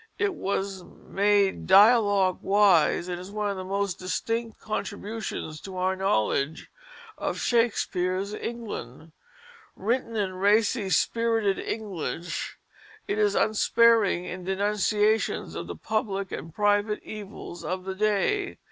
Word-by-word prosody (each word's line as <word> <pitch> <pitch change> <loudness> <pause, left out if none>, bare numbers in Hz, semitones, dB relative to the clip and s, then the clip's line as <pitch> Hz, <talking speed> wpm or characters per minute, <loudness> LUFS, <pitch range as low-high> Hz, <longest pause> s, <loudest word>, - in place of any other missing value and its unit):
It 405 -3 0
was 195 - -3
"made 200 +1 0
dialogue 200 -2 +5
wise," 195 -4 +4
and 180 -1 -4
is 185 - -9
one 210 0 -2
of - - -4
the 185 - -5
most 195 0 -2
distinct 225 +5 -3
contributions 205 -6 -5
to 190 -1 -8
our 185 +1 +1
knowledge 155 - 0 0.5
of - - -2
Shakespeare's 200 -5 0
England. 205 - -6 0.6
Written 230 +3 -1
in 200 -3 -1
racy, 205 +1 +2
spirited 225 0 +1
English, 180 -5 -4 0.5
it 210 - -1
is 205 -1 +2
unsparing 215 -3 +3
in 180 0 -6
denunciations 210 +3 +1
of - - -5
the - - -6
public 200 -3 -2
and 165 - -6
private 205 +3 +1
evils 205 -4 -8
of 185 0 -3
the 190 0 -4
day. 215 - 0
200 Hz, 120 wpm, -26 LUFS, 185-215 Hz, 0.6 s, dialogue